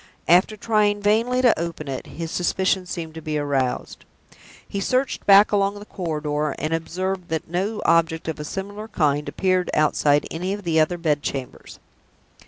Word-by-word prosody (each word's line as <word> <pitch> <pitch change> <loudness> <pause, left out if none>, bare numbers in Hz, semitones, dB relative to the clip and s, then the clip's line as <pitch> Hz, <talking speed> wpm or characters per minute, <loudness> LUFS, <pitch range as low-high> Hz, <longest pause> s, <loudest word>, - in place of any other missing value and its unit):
After 185 +5 +4
trying 210 -1 +2
vainly 230 +5 +2
to 245 -8 +4
open 165 -3 -4
it, 135 -1 -5
his 165 0 -6
suspicion 185 +1 0
seemed 165 -2 -5
to 160 - -8
be 155 -1 -2
aroused. 140 -3 -2 0.6
He 200 - -4
searched 255 +6 -1
back 200 +1 +7
along 200 0 +1
the 205 - -10
corridor, 150 -6 -2
and 155 +1 -2
observed 185 +3 -3
that 160 -1 -3
no 190 +6 -2
object 165 -1 +2
of 160 -2 -3
a - - -4
similar 205 +6 -6
kind 150 -8 0
appeared 185 -1 0
outside 150 -1 +3
any 180 +4 -2
of 205 0 -6
the 165 -2 +2
other 155 +3 +2
bed 155 -4 0
chambers. 135 -3 -6
175 Hz, 170 wpm, -23 LUFS, 155-200 Hz, 0.6 s, back